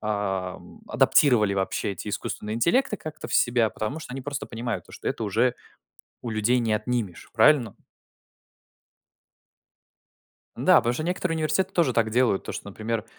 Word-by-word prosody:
ам, 95 -3 -3
адаптировали 110 -8 +4
вообще 95 +1 -1
эти 100 - -7
искусственные 105 +1 -4
интеллекты 210 - +2
как-то 155 -3 -8
в - - -4
себя, 120 -2 +3
потому 110 +10 -4
что 140 - -9
они 135 - -5
просто 140 0 -4
понимают 115 0 -4
то, - - -17
что - - -5
это 115 - -3
уже 115 +5 +1 0.7
у 120 - -5
людей 110 +3 +2
не 115 -2 0
отнимешь, 105 -4 -3
правильно? 120 +1 +4 2.8
Да, - - +5
потому 120 - +2
что 155 - -3
некоторые 180 0 -1
университеты 160 +4 0
тоже 165 -8 +2
так 115 -2 +2
делают. 120 -4 +2
То, - - -5
что, - - -7
например, 110 +2 -3
115 Hz, 155 wpm, -25 LUFS, 105-140 Hz, 2.8 s, Да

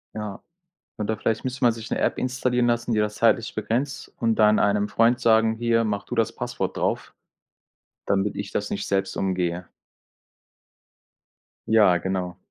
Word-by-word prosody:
Ja. 105 -2 -6 0.6
Oder 110 0 -2
vielleicht 110 +2 -1
müsste 130 +1 -4
man 120 - +6
sich 115 0 -9
'ne - - -1
App - - 0
installieren 125 -1 0
lassen, 120 0 0
die 105 - +2
das 105 0 0
zeitlich 115 0 +2
begrenzt 125 +5 -3
und 115 -1 +1
dann 105 -1 +4
einem 105 0 +2
Freund 115 +3 +3
sagen: 110 -1 +3
„Hier, 115 0 +1
mach 100 -2 -2
du 125 - -5
das 115 -3 +1
Passwort - - -4
drauf, - - -2 0.9
damit 100 +1 0
ich 100 -1 -5
das 105 - -3
nicht 100 - -3
selbst 95 -1 -1
umgehe.“ 90 -2 -1 2.0
Ja, 105 -5 +5
genau. 90 -1 -3
110 Hz, 160 wpm, -24 LUFS, 100-115 Hz, 2.0 s, man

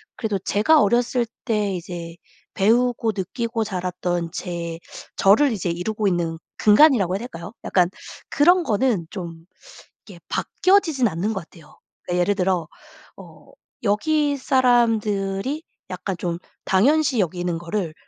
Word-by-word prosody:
그래도 215 -4 -2
제가 225 - +3
어렸을 240 +2 +1 0.2
때 210 -4 0
이제 170 -1 -7 0.4
배우고 230 +2 +2
느끼고 225 +4 -2
자랐던 180 -3 -3
제 170 -3 -5 0.4
저를 230 +8 +5
이제 195 -5 -2
이루고 205 +5 -2
있는 170 -3 -1 0.2
근간이라고 210 - +5
해야 - - -2
될까요? 205 -4 -8
약간 180 -2 +2 0.4
그런 350 +4 +4
거는 225 - 0
좀 170 -4 -8 0.6
이게 - - -12
바뀌어지지는 320 - +2
않는 195 +7 -2
것 190 - -4
같아요. 165 -3 -18 0.3
그러니까 180 0 -1
예를 205 +3 +2
들어 180 -4 0 0.5
어 - - -15 0.3
여기 285 +7 +1
사람들이 230 -1 +1 0.3
약간 185 0 -4
좀 170 -1 -3 0.3
당연시 270 +5 +3
여기는 175 -1 -1
거를 170 -1 -3
200 Hz, 290 characters per minute, -22 LUFS, 175-240 Hz, 0.6 s, 저를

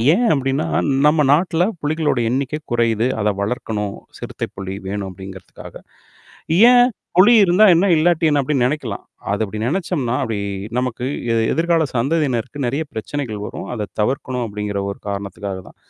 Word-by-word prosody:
ஏன் 235 +2 +2
அப்பிடின்னா 135 +4 -1 0.4
நம்ம 150 -1 +3
நாட்ல 175 +3 +2
புலிகளோட 150 -2 0
எண்ணிக்கை 135 +4 -2
குறையுது. 115 0 +1
அத 105 0 +1
வளர்க்கணும், 105 -2 -3 0.2
சிறுத்தை, - - -5
புலி 95 0 -5
வேணும் 100 0 -3
அப்பிடிங்கிறதுக்காக. 95 0 -11 1.0
ஏன் 245 0 +6 0.3
புலி 190 +6 +7
இருந்தா 185 +3 +4
என்ன? 175 +3 +4
இல்லாட்டிய 160 0 +3
என்ன? 145 -1 +3
அப்பிடின்னு 135 -2 +1
நெனைைக்கலாம். 125 -7 -3 0.3
அத 100 +2 0
அப்பிடி 105 +1 -6
நெனச்சம்னா 150 -4 -1
அப்பிடி 115 -5 -2 0.4
நமக்கு 125 -1 -2 0.3
எ - - +2 0.2
எதிர்கால 165 0 +2
சந்ததியினருக்கு 135 0 -1
நெறைய 135 +6 -1
பிரச்சனைகள் 110 -2 -4
வரும். - - -7
அத 110 -4 -3
தவிர்க்கணும் 125 +2 -1
அப்பிடிங்கிற 105 -2 -4
ஒரு 100 - -7
காரணத்துக்காக 100 -1 -5
தான். - - -16
130 Hz, 145 wpm, -19 LUFS, 105-155 Hz, 1.0 s, புலி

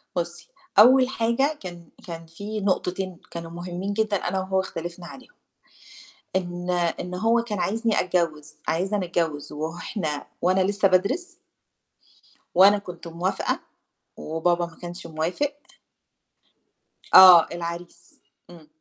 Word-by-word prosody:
بُصّي 170 -1 -4 0.3
أول 255 +4 +7
حاجة 270 +5 0
كان 175 -3 -9 0.2
كان 165 -1 -7
في 200 +6 -6
نقطتين 185 -1 -1
كانوا 165 -1 -7
مُهمّين 175 +3 -5
جدًا 215 -1 +1
أنا 185 +1 -2
وهو 190 0 0
اختلفنا 175 -1 -6
عليهم، 260 - -12 1.1
إن 175 -1 -3
إن 175 0 -1
هو 225 +5 +2
كان 215 -4 -4
عايزني 220 +5 +1
أتجوّز 165 -5 -1
عايزنا 190 +3 0
نتجوّز 160 -4 -2
وه 160 +3 -5
إحنا 155 -9 -4 0.2
وأنا 185 +2 +3
لسّه 200 +1 +2
بادرس 270 - 0 1.2
وأنا 200 +3 +7
كنت 180 -4 -9
موافقة 175 +3 -2 0.6
وبابا 170 +2 0
ما 170 -1 -13
كانش 175 0 -8
موافق 165 - -2 1.6
آه، 180 -3 +10
العريس 170 0 -8 0.3
إمم. 165 -3 -14
180 Hz, 120 wpm, -24 LUFS, 170-200 Hz, 1.6 s, آه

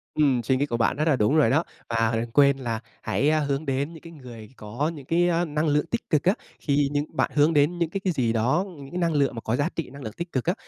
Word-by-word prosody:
Ừm, 135 -6 +2
suy 130 +3 +1
nghĩ 145 - +1
của 120 -5 -2
bạn 115 +3 +1
rất 155 +2 0
là 145 - +4
đúng 125 +6 +2
rồi 155 - +4
đó. 160 +5 +3 0.3
Và 115 0 +1
đừng 115 +1 -3
quên 140 +1 +5
là 115 -4 -3 0.2
hãy, 145 - +1
a, 155 0 +3
hướng 140 +1 -1
đến 140 +4 -2
những 160 - -12
cái 165 0 -12
người 120 -7 -11
có 120 +10 -3
những 140 -4 -10
cái, 175 +3 +2
ơ, 175 0 +1
năng 150 +1 -1
lượng 150 +1 +2
tích - - -4
cực 150 -2 +2
á, 185 - +4 0.3
khi 145 -1 +1
những 145 +1 0
bạn - - +1
hướng 150 +2 +3
đến 150 +4 +3
những 170 -2 0
cái 195 - -3
cái 190 -2 -1
gì 120 -5 0
đó, 130 - +1
những 140 -1 -11
cái 180 - -4
năng 170 -2 +1
lượng 140 -4 +1
mà 115 - -5
có 110 - -1
giá 145 +6 0
trị 165 - -4
năng 140 +1 -11
lượng 110 - -6
tích 170 0 -5
cực 130 - -2
á, 175 - +2
145 Hz, 300 wpm, -25 LUFS, 125-160 Hz, 0.3 s, quên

